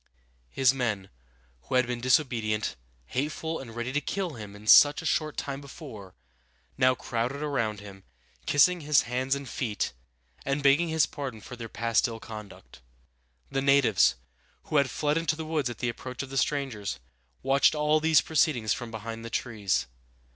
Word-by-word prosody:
His 135 - +3
men, 105 -7 -2 0.5
who - - -3
had 125 -1 +4
been 120 -1 -4
disobedient, 120 -5 +1 0.3
hateful, 155 - -3
and 115 -4 -10
ready 120 +2 -3
to 145 - +1
kill 190 +3 -2
him 105 -4 -10
such 145 +8 +7
a - - -8
short 155 -1 0
time 140 0 -4
before, 130 - -11 0.6
now 130 0 +4
crowded 125 +5 -3
around 115 -8 -1
him, 100 -2 -12 0.4
kissing 175 +5 +4
his 150 -1 +4
hands 130 +3 -1
and 140 -1 -6
feet, 110 - -2 0.5
and 140 +1 -1
begging 145 +5 +4
his 160 -2 +3
pardon 135 -6 -6
for 125 - -10
their 115 -2 -8
past 115 +2 +1
ill 115 -1 -7
conduct. 110 - -11 0.7
The 135 - 0
natives, 140 -7 +4 0.5
who 155 - -1
had 140 -2 +3
fled 150 +4 0
into 165 -1 0
the 160 0 -6
woods 155 -5 -1
at 120 - -7
the 120 - -1
approach 125 +2 -6
of 135 - -10
the - - -6
strangers, 135 -9 -2 0.4
watched 135 +3 +4
all 150 +1 +3
these 160 0 +4
proceedings 145 -8 +1
from 120 -2 -6
behind 115 +1 -7
the 115 - -6
trees. 105 - -1
130 Hz, 170 wpm, -28 LUFS, 115-145 Hz, 0.7 s, such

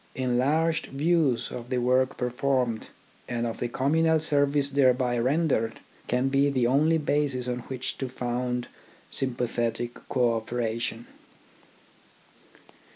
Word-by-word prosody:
Enlarged 140 +6 +1
views 140 -4 +1
of 120 0 -7
the 130 - 0
work 130 +2 +2
performed, 125 -2 0 0.4
and 120 -1 -1
of 115 - -4
the 120 - -1
communal 160 +6 +2
service 145 -2 +2
thereby 130 -3 +3
rendered, 130 -2 +1 0.3
can 125 +2 +1
be 140 +1 +3
the 130 -3 +1
only 150 +6 +3
basis 145 -4 0
on 125 0 -2
which 130 -1 -4
to 130 - -3
found 125 0 -2 0.4
sympathetic 120 -2 -1 0.2
co 120 -3 +2
operation. 115 0 -3
125 Hz, 115 wpm, -27 LUFS, 120-140 Hz, 0.4 s, thereby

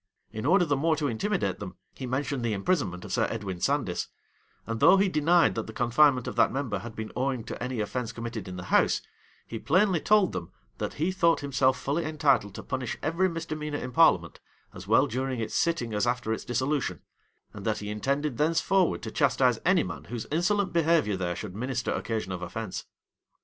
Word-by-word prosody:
In 110 +4 -4
order 180 +2 +5
the 145 -3 +1
more 160 +3 +2
to 150 -1 -1
intimidate 195 - -1
them, 95 -3 -7 0.2
he 130 - -6
mentioned 130 0 -2
the 115 -2 0
imprisonment 100 - -1
of - - -6
Sir - - +2
Edwin 100 -5 -5
Sandys; 140 -11 0 0.6
and 115 0 -3
though 190 - +7
he 195 +1 +3
denied 170 0 +3
that 115 - -4
the 110 - -8
confinement 125 +2 +3
of - - -4
that - - +4
member 130 -6 -2
had 115 -1 -9
been 110 -1 -5
owing 130 -2 -1
to - - -6
any 125 -2 -3
offence 115 +2 -3
committed 115 -3 -6
in 90 - -6
the 90 - -6
house, - - +3 0.4
he 115 - -6
plainly 185 - +3
told 210 -3 +4
them, - - -5 0.3
that - - -3
he 165 +5 0
thought 170 -4 +2
himself 135 -2 +1
fully 145 +5 -1
entitled 140 -10 +1
to - - -7
punish 130 -3 -3
every 175 +4 +1
misdemeanor 155 -3 -4
in 125 - -5
parliament, - - +3 0.3
as - - -10
well - - +5
during 130 +1 -2
its 110 - -4
sitting 165 -10 0
as 105 +3 +1
after 120 -2 0
its - - -5
dissolution; 130 +4 -1 0.5
and - - -9
that - - 0
he 105 0 -5
intended 140 +5 -1
thenceforward 165 +4 +2
to - - -5
chastise 130 -5 +2
any 185 0 +4
man 75 -5 -7
whose 115 +4 -5
insolent 185 +4 +1
behavior 165 - +2
there 90 -2 -2
should 90 - -6
minister 125 +2 -2
occasion 110 -4 -3
of 90 -1 -4
offence. 95 +3 -5
130 Hz, 200 wpm, -27 LUFS, 110-160 Hz, 0.6 s, though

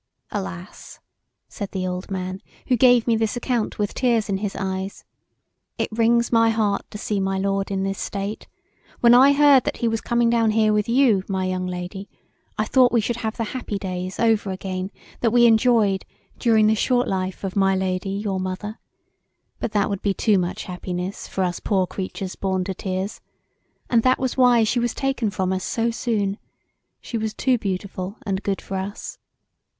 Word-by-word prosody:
"Alas!" 90 -2 -7 0.5
said 200 - -6
the 185 -1 -2
old 180 0 -4
man[,] 185 0 -4 0.2
who 255 - +2
gave 245 -1 +5
me 235 - +3
this 220 0 0
account 240 -2 -1
with 205 -1 -1
tears 235 -4 +1
in 195 - +1
his 205 -1 -3
eyes, 190 0 -4 0.7
"it - - -2
wrings 235 +1 +2
my 230 -1 +5
heart 215 -3 +1
to - - -7
see 210 -1 -2
my 195 0 0
lord 195 0 -1
in 195 -1 -1
this 195 0 -2
state: 200 +1 -4 0.5
when 235 0 +7
I 265 +3 +7
heard 280 -2 +6
that - - -2
he 235 - 0
was 225 0 -1
coming 235 0 +1
down 230 -1 +3
here 215 0 +3
with 210 +1 0
you, 235 -6 +4
my 190 -1 -1
young 185 0 -2
lady, 180 +2 -6 0.5
I 215 - +1
thought 250 +2 +4
we 235 - +3
should 230 +2 -1
have 220 -1 -4
the 230 - -1
happy 240 -5 -3
days 185 -1 -5
over 225 -3 +2
again 185 0 -4 0.3
that 230 - +2
we 240 +1 +5
enjoyed 220 -4 +4 0.4
during 220 -3 +4
the 215 - +4
short 245 +3 +1
life 185 0 -3
of 190 -1 -3
my 195 -1 +3
lady 185 0 -1
your 200 -1 -2
mother 185 +4 -5 0.8
But - - -3
that 205 -1 +2
would 200 -2 -3
be 200 -2 0
too 210 -1 +3
much 175 0 -3
happiness 180 +1 -5
for 190 - -2
us 180 -1 -1
poor 190 -3 +1
creatures 190 0 -5
born 190 -1 -1
to 190 - -3
tears 190 +2 -4 0.7
and 235 -2 +3
that 255 +2 +3
was 260 -1 -2
why 245 -3 +5
she 230 +3 +1
was 240 -1 -1
taken 270 -5 0
from 190 -2 -1
us 185 0 -2
so 230 0 0
soon; 210 -4 -1 0.6
[s]he 230 - -3
was 220 0 -3
too 255 -2 +2
beautiful 190 -1 -4
and 195 -2 -1
good 195 -1 -2
for 190 - -4
us[. 195 +2 -6
205 Hz, 190 wpm, -23 LUFS, 190-230 Hz, 0.8 s, when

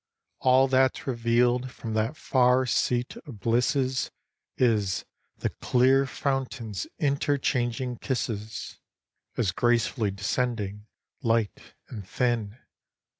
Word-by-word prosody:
All 130 +1 +5
that 130 0 +3
's - - -10
reveal'd 120 0 +2
from 115 -2 -6
that 110 +7 0
far 130 0 +3
seat 125 +1 0
of 120 -8 -11
blisses, 130 +4 +1 0.5
Is, 105 -7 +1 0.3
the - - -1
clear 130 +2 +3
fountains' 130 -7 -3
interchanging 130 -4 0
kisses. 110 -5 -4 0.6
As 105 -6 +1
gracefully 115 +1 +1
descending, 105 0 -2 0.3
light 115 -4 +2 0.4
and 105 -6 -9
thin. 120 -3 -1
120 Hz, 100 wpm, -27 LUFS, 110-130 Hz, 0.6 s, All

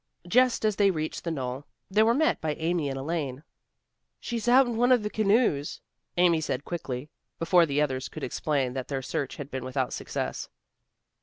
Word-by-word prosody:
Just 250 +4 +3
as 215 -2 +1
they 200 -1 +5
reached 155 -4 -3
the 170 - -2
knoll 130 -3 -3 0.3
they 210 +3 +4
were 230 +2 +4
met 315 +3 +2
by 155 -1 -1
Amy 160 -2 -1
and 135 - -4
Elaine. 140 -2 -3 0.8
"She's 235 -1 -4
out 260 +2 +7
in 240 -2 -3
one 245 +3 +3
of 245 -4 +5
the 210 - -3
canoes," 210 - +2 0.4
Amy 175 -2 +4
said 140 -2 -3
quickly, 145 -5 -5 0.3
before 170 0 +4
the 145 +1 +2
others 130 -3 -2
could - - -8
explain 135 -1 -1
that 130 -1 -4
their 135 -2 -3
search 135 +1 -3
had 145 0 -8
been 130 - -4
without 130 0 -2
success. - - -4
160 Hz, 185 wpm, -27 LUFS, 135-210 Hz, 0.8 s, out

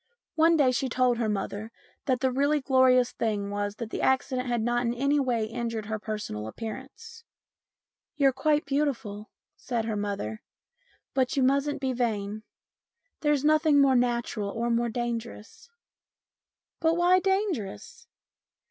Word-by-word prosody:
One 325 +1 +4
day 270 -4 +4
she 255 +1 -1
told 250 -1 +2
her 225 -2 0
mother 205 +2 -3 0.3
that 255 -2 0
the 260 -1 +2
really 285 +3 +2
glorious 260 -2 +4
thing 205 -3 -2
was 205 0 -2
that 225 0 -6
the - - -3
accident 260 -1 +1
had 240 -2 0
not 240 +1 +1
in 235 0 -1
any 280 +3 +2
way 245 -5 0
injured 230 -1 -4
her 215 0 -3
personal 205 - -5
appearance. 270 - -8 0.5
" - - -66
You're 275 -3 +4
quite 300 +3 +1
beautiful," 255 -8 -2 0.3
said 235 -3 -3
her 220 -1 -2
mother, 200 - -3 0.4
" - - -39
but 265 +3 0
you 270 - +3
mustn't 275 +2 +1
be 260 -1 0
vain. 215 -4 -2 0.8
There's 295 -2 +1
nothing 310 -1 +4
more 275 -2 +5
natural 240 -4 0
or 235 +3 -2
more 235 0 +1
dangerous." 235 - -5 0.5
" - - -67
But 330 +1 +2
why 355 +1 +5
dangerous 380 - -2
245 Hz, 155 wpm, -27 LUFS, 220-280 Hz, 0.8 s, more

